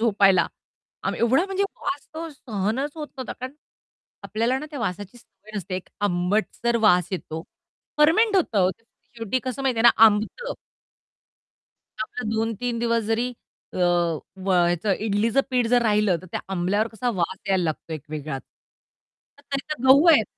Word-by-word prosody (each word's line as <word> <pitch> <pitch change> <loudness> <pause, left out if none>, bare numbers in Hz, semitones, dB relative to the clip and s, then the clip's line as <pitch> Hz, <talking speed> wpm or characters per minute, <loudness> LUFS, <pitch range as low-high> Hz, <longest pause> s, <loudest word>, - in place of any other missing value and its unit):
झोपायला 200 -4 +4 0.6
आम - - -1
एवढा 255 +9 +3
म्हणजे 390 0 -1 0.2
वास 285 - -3
तो 330 +1 -5
सहनच 245 +1 -2
होत 310 -2 -5
नव्हता. 260 -2 -5
कारण 255 +1 -7 0.7
आपल्याला 230 +4 0
ना 300 - -6
त्या 290 - -6
वासाची 205 +1 -4
सवय 215 -2 -14
नसते 190 -2 -4
एक 185 - -8 0.2
आंबटसर 205 +6 0
वास 180 -4 +4
येतो 160 -3 -4 0.6
फर्मेंट 390 +8 +5
होतं 310 - +1
हो 185 0 +4
ते 190 - -15 0.3
शेवटी 230 +2 -1
कसं 255 +1 -3
माहितीये 250 -4 +1
ना 235 - +9
आंबतं. 220 - +2 1.5
आपला 220 +2 -6
2-3 225 +2 -1
दिवस 230 0 +1
जरी 225 +3 0 0.4
अ, - - -8
व 175 +2 0 0.2
ह्याच 175 +3 -1 0.2
इडलीचं 220 +5 +2
पीठ 250 -2 +2
जर 245 0 +4
राहिलं 210 -4 +3
तर - - -11
त्या - - -2
आंबल्यावर 195 +5 +1
कसा 230 +2 -2
वास 175 -3 -1
यायला 190 -2 +2
लागतो 160 0 -3
एक 155 -3 -5
वेगळाच. 150 -3 -5 1.0
तर 285 0 -7
हे - - -2
तर 250 - -6
गहू 275 +5 +7
आहेत. 240 -9 +6
225 Hz, 160 wpm, -24 LUFS, 190-255 Hz, 1.5 s, ना